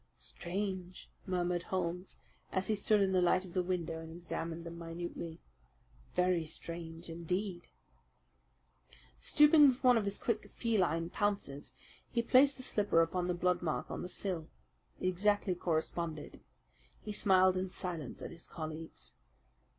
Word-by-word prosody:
"Strange!" 185 0 -5 0.2
murmured 180 -1 0
Holmes, 180 0 -3 0.3
as 190 +2 -1
he 215 - +3
stood 210 0 +3
in 195 -1 +3
the 185 -1 +3
light 185 +1 +3
of 175 - -11
the 185 - +2
window 175 -3 -2
and 160 0 -8
examined 170 0 -5
them 170 0 -7
minutely. 165 -1 -6 0.8
"Very 180 -2 +3
strange 165 +1 -6
indeed!" 175 +2 -3 1.5
Stooping 300 0 +7
with 260 0 +1
one 250 -2 +6
of 210 - -3
his 200 0 +1
quick 225 -2 -2
feline 175 -8 +1
pounces, 200 -9 -1 0.4
he 235 -1 0
placed 270 +4 +5
the 255 - -7
slipper 205 -8 +3
upon 175 +2 -1
the 180 - 0
blood 180 0 +1
mark 160 -3 -2
on - - -4
the 180 - -5
sill. 180 -5 -3 0.5
It - - -4
exactly 200 +1 +2
corresponded. 165 -2 -2 0.7
He 215 - -3
smiled 185 -2 +4
in 185 0 -1
silence 170 -7 -5
at - - -5
his 170 -1 -9
colleagues. 160 0 -7
180 Hz, 145 wpm, -34 LUFS, 170-200 Hz, 1.5 s, Stooping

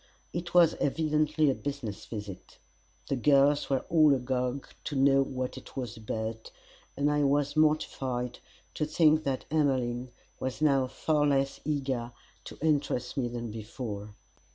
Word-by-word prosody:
It 170 +1 -5
was 170 -2 +7
evidently 155 0 +2
a - - 0
business 135 -8 -5
visit. 105 -4 -8 0.5
The 140 - 0
girls 140 +2 +3
were 135 -2 0
all 155 -4 +5
agog 125 +1 -2 0.2
to 145 - -3
know 135 0 +5
what 130 -1 -3
it - - -15
was 125 -3 -4
about, 110 0 -5 0.5
and 145 +1 +2
I 150 0 +2
was 145 +1 +1
mortified 135 -5 0 0.3
to 155 - -1
think 155 0 +4
that 135 -2 -2
Emmeline 130 -5 +1 0.3
was 130 -1 -3
now 140 -4 +3
far 150 +2 +1
less 135 -1 +1
eager 135 -5 -2 0.3
to - - -9
interest 140 -5 0
me 130 -4 0
than 120 -1 -5
before. 105 -1 -6
135 Hz, 145 wpm, -29 LUFS, 125-150 Hz, 0.5 s, was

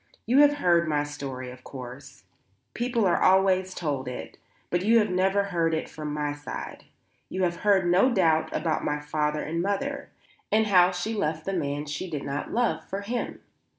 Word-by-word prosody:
"You 255 +4 +4
have 290 0 +6
heard 170 - +3
my 150 -1 +1
story, 135 -3 -6
of 125 0 -13
course; 130 -1 -10 0.5
people 240 -2 0
are 175 - +2
always 185 0 +3
told 140 -6 -2
it; 125 0 -7 0.3
but 175 - +1
you 230 +3 +5
have 210 -3 +2
never 190 +2 +2
heard 170 -4 0
it 160 - -3
from 150 -1 -6
my 150 -1 -2
side. 145 0 -7 0.4
You 185 0 -2
have 175 -1 0
heard 200 -3 +3
no 180 +9 +4
doubt 165 -7 +2
about 155 0 -1
my 150 0 -1
father 150 0 -1
and 165 +2 -2
mother, 240 +9 -2 0.4
and 220 +1 +4
how 180 -4 +5
she 185 +5 -3
left 160 -7 -2
the 195 - -2
man 145 -4 -2
she 150 +5 -5
did 150 -4 -4
not 140 +1 -4
love 240 +1 0
for 195 +1 -5
him. 235 +4 -4
175 Hz, 185 wpm, -26 LUFS, 150-200 Hz, 0.5 s, have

